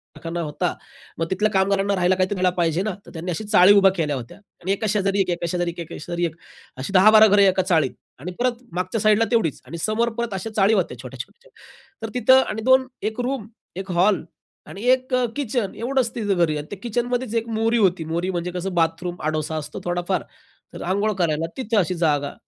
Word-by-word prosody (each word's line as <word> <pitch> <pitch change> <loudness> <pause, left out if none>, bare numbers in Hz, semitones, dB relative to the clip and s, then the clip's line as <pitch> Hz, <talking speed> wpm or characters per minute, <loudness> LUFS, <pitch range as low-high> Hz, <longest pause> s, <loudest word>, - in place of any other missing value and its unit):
कारखाना 170 +1 -5
होता. 150 -2 -2 0.5
मग 165 - +1
तिथल्या 210 +3 +1
कामगारांना 195 +1 +1
राहायला 180 0 +2
काहीतरी 185 +2 0
द्यायला 185 0 +2
पाहिजे 170 0 +1
ना, 215 0 -1
तर - - -13
त्यांनी 175 +2 -4
अशी 195 +6 -4
चाळी 205 -2 +6
उभ्या 195 -1 +6
केल्या 155 -5 -1
होत्या 120 -3 -8 0.2
आणि 185 - -2
एका 205 +2 -1
शेजारी 200 -1 +1
एक-एक, 185 -2 +1
एका 175 - -4
शेजारी 175 -1 -1
एक-एक, 170 -1 -9
एका - - -6
शेजारी 175 +1 -2
एक. 165 -1 -4 0.4
अशी 135 +9 -5
10-12 215 +3 +7
घरे 200 -1 +5
एका 190 0 +3
चाळीत 165 -8 +1 0.3
आणि 180 +7 -6
परत 245 0 0
मागच्या 185 +4 -2
साइड 215 0 +4
ला 225 - +3
तेवढीच 215 - +1
आणि 170 - -7
समोर 215 +7 0
परत 235 -3 -2
अशा 195 +4 -4
चाळी 205 +1 +4
होत्या 175 - 0
छोट्या-छोट्या. 135 - -10 0.5
तर 225 - -3
तिथं 255 +1 +5
आणि 220 - -3
2 260 0 +5 0.2
एक 220 - -12
रूम, 250 -3 -3 0.3
एक 190 0 -5
हॉल 185 +1 +2 0.4
आणि 200 - -9
एक 255 0 0
अ, 250 -1 +3
किचन 245 -7 -2
एवढंच 250 0 0
तिथं 210 -4 0
घरी 155 -2 -2
आणि 150 +1 -6
त्या 205 - -6
किचन 240 +1 -1
मध्येच 245 -2 -2
एक 230 0 0
मोरी 225 +1 +2
होती, 185 -6 +2
मोरी 175 +3 -1
म्हणजे 175 0 -3
कसं 180 +1 -4
बाथरूम, 170 +1 0
आडोसा 155 0 -2
असतो 150 -1 -5
थोडाफार. 175 +1 -1 0.5
तर - - -7
अंघोळ 200 +4 0
करायला 155 0 0
तिथं 230 -4 -1
अशी 180 0 0
जागा 145 -4 0
190 Hz, 215 wpm, -22 LUFS, 170-220 Hz, 0.5 s, 10-12